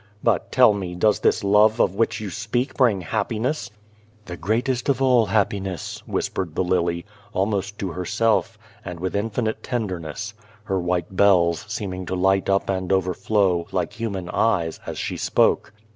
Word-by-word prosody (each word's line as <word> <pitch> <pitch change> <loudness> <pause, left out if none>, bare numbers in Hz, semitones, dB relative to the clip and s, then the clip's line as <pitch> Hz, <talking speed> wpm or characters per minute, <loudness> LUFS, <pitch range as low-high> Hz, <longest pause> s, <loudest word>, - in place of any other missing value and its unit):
But, 110 -7 +1
tell 125 -4 +6
me, 95 -3 -4
does 105 +3 +2
this - - +2
love 105 +3 +4
of - - +3
which 110 +2 0
you 105 -3 -5
speak 120 - -2
bring 115 -8 +2
happiness? 120 - -2 0.3
" 105 0 -32
"The 90 - -6
greatest 120 - -1
of 135 - +2
all 125 -4 +4
happiness," 95 -3 -1
whispered 85 -5 -2
the - - +1
lily, 85 -1 0 0.3
almost 100 +1 -1
to 95 -3 -3
herself, 110 +5 0 0.3
and 90 -1 -7
with 95 +2 -3
infinite 110 +2 -1
tenderness 105 - -4 0.3
her 95 -3 -1
white 90 0 -2
bells 90 -5 +4
seeming 95 -3 -4
to 95 - -2
light 95 +1 +2
up 100 0 +2
and 95 -1 -2
overflow, 95 -1 +1
like 90 -3 -1
human 100 -6 -4
eyes, 90 -6 +1
as - - -5
she - - -3
spoke. - - +2
100 Hz, 160 wpm, -23 LUFS, 90-110 Hz, 0.3 s, tell